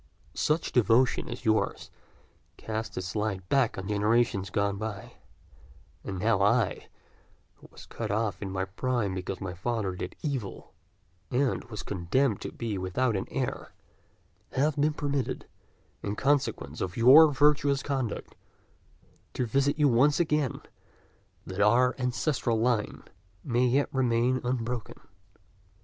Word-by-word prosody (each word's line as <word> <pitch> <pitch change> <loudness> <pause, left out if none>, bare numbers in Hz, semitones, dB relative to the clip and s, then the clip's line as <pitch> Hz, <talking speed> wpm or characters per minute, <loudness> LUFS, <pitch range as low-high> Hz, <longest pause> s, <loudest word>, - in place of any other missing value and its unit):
Such 155 +2 0
devotion 125 +1 +3
as 120 +2 -7
yours 110 0 0 0.7
casts 110 0 -5
its 95 +2 -4
light 100 -4 -2
back 135 -5 +2
on 95 0 -5
generations 105 -1 +1
gone 100 +1 0
by; 110 -1 -6 0.9
and 95 -2 -5
now 105 +1 +2
I, 105 +1 +2 0.7
who - - -16
was - - -13
cut 110 -2 -5
off 105 0 -1
in 100 - -4
my 95 0 -2
prime 110 +1 -1
because 95 +1 -4
my 95 -2 -5
father 100 0 -2
did 90 0 -6
evil, 135 -10 -4 0.6
and 130 +1 0
was 110 -3 -7
condemned 105 +6 0
to - - -5
be 110 -5 -4
without 105 +6 0
an 95 - -2
heir, - - -4 0.8
have 145 +2 +1
been 150 +1 +2
permitted, 140 -3 -2 0.6
in 100 0 -3
consequence 140 +3 0
of 90 -1 -3
your 140 +7 +8
virtuous 145 0 +3
conduct, 135 -6 -3 1.0
to 125 - 0
visit 140 +5 +1
you 150 -1 +4
once 140 +5 +4
again, 150 -5 0 0.8
that 95 +2 -4
our 125 +5 +4
ancestral 125 -2 0
line 115 -2 0 0.4
may 125 -1 +2
yet 135 +4 +1
remain 125 -1 +1
unbroken." 120 -2 -3
115 Hz, 130 wpm, -28 LUFS, 100-130 Hz, 1.0 s, your